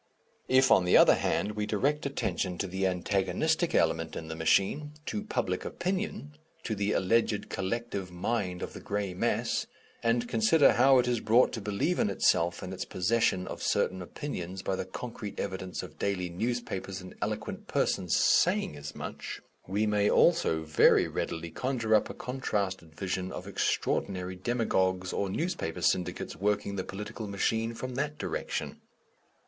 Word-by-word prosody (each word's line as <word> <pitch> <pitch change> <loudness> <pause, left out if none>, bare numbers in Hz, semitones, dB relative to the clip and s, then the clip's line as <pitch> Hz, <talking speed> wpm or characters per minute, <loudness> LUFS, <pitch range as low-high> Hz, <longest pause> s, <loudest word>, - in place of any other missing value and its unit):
If, 130 0 +4
on 90 - +6
the 90 - +6
other - - +8
hand, 105 - 0
we 105 0 -3
direct 140 +7 0
attention 90 -9 -2
to - - -1
the 95 +1 0
antagonistic 95 0 0
element - - +1
in 80 - -6
the 80 - -4
machine, 100 - +1
to 210 - -2
Public 120 - -2
Opinion, 180 -5 -3 0.3
to 110 - -2
the 100 0 0
alleged 105 +2 +1
collective 100 -1 -3
mind 90 0 -2
of - - -6
the - - -8
grey 100 -2 -2
mass, 90 - 0 0.3
and 120 +1 +1
consider 115 +7 +5
how 135 +2 +6
it 125 - +3
is 120 -2 +1
brought 115 +4 +4
to 110 - -4
believe 105 - 0
in - - +2
itself 85 -2 +2
and 90 +1 -5
its 95 - -3
possession 95 -1 +1
of - - -7
certain 95 0 +1
opinions 95 -3 -5
by 95 - 0
the 95 - -3
concrete 105 +1 -7
evidence 95 -2 -4
of - - -11
daily 90 -3 -1
newspapers 95 -1 -3
and 90 -1 -10
eloquent - - -4
persons - - +1
saying - - +3
as 75 +1 -8
much, - - -6 0.3
we 100 +4 +1
may 105 -1 +2
also 165 - +3
very 75 -1 +5
readily 80 0 -4
conjure 125 -2 -1
up 105 - +4
a - - -7
contrasted 100 -10 -3
vision 95 0 -3
of - - -6
extraordinary 95 -1 -1
demagogues 95 -4 0
or 100 - -1
newspaper 160 - -2
syndicates 90 -1 0
working 100 0 0
the 95 - -2
political 105 +3 -6
machine 110 +3 0
from 130 +2 -5
that 145 +3 -2
direction. - - -4
100 Hz, 160 wpm, -29 LUFS, 90-120 Hz, 0.3 s, other